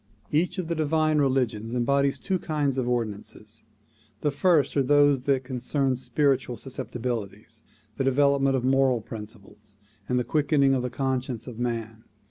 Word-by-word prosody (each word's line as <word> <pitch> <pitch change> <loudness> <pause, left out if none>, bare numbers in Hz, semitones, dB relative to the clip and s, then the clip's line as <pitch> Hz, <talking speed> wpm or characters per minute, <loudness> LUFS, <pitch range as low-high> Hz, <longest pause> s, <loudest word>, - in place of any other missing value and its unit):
Each 160 +4 +1
of 180 -3 -3
the 170 - -1
divine 155 -1 +1
religions 125 -5 0
embodies 140 +3 +1
two 190 -1 -2
kinds 145 -5 -1
of 125 -1 -1
ordinances. 110 -1 -4 0.6
The 150 - +1
first 150 -1 +2
are 140 - +3
those 145 -1 +4
which 135 -2 +2
concern 130 +1 -1
spiritual 130 -2 0
susceptibilities, 115 -5 -5 0.4
the - - 0
devel 140 +1 +3
opment 135 0 +2
of 130 - -1
moral 130 -2 +3
principles 105 -1 -11 0.3
and 125 - +1
the 125 - +1
quickening 140 -1 +2
of 130 - +1
the 125 - -3
conscience 130 -2 -2
of 120 -3 -9
man. 115 -2 -4
130 Hz, 155 wpm, -26 LUFS, 120-140 Hz, 0.6 s, those